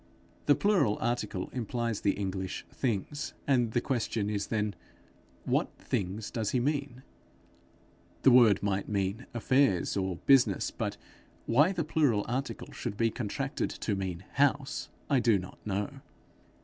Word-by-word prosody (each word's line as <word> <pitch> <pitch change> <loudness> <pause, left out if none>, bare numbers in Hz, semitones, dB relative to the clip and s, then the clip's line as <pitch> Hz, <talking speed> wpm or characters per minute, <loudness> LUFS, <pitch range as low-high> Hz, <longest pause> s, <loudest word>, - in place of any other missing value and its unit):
The 145 - +6
plural 195 - +2
article 105 -6 -2
implies 120 -2 -2
the 100 - +2
English 95 -2 -4
things; 130 +4 -2
and 120 -5 +2
the 120 - +2
question 115 -5 -1
is 100 -1 -2
then, 105 -2 -1 0.7
What - - +1
things 100 +3 -3
does 110 -4 -1
he 125 - +1
mean? 135 -1 -2 1.2
The 130 - +7
word 115 -6 +6
might 100 -1 -1
mean 100 +3 -1
affairs 120 -6 +2
or 95 -2 -1
business; 125 -8 +4
but - - -3 0.5
why 145 +10 +4
the 175 -4 -1
plural 145 -9 +2
article 130 +4 -3
should 110 -5 -5
be 115 0 +2
contracted 105 -4 -2
to - - -3
mean 95 -2 -4
house, 140 0 +1 0.2
I 140 -3 +3
do 115 -4 +4
not 90 0 -8
know. 100 0 -2
115 Hz, 140 wpm, -30 LUFS, 100-130 Hz, 1.2 s, The